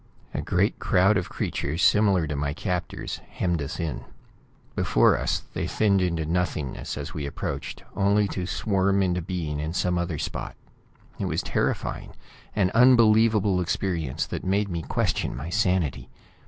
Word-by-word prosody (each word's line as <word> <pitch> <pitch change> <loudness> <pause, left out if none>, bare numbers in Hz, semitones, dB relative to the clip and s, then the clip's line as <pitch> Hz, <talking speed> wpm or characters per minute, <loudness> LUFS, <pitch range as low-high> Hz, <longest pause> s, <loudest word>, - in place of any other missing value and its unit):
A - - -2
great - - +1
crowd 95 +4 +3
of 90 -3 -1
creatures 80 +6 -2
similar 100 -5 +4
to 75 -1 -3
my 70 +1 -2
captors 90 -1 -3
hemmed 85 -3 -1
us 70 +5 -5
in. 80 -6 -3 0.7
Before - - +4
us, - - -1
they - - -2
thinned 100 -3 +2
into 85 -3 0
nothingness 80 -6 -2
as 70 0 -6
we 75 -3 -4
approached, 70 - -5
only 100 +1 +3
to 90 -2 -3
swarm 100 -1 +1
into 90 -1 0
being 80 -4 -3
in 75 +2 -3
some 90 -1 0
other 85 -2 -2
spot. - - -4 0.6
It - - -1
was - - -1
terrifying; - - -2 0.4
an 95 -3 +2
unbelievable 110 -5 +5
experience 85 -6 -1
that - - -5
made 100 +2 +1
me 85 -2 -3
question 70 - -1
my 75 +6 -5
sanity. 90 - 0
90 Hz, 155 wpm, -25 LUFS, 80-100 Hz, 0.7 s, unbelievable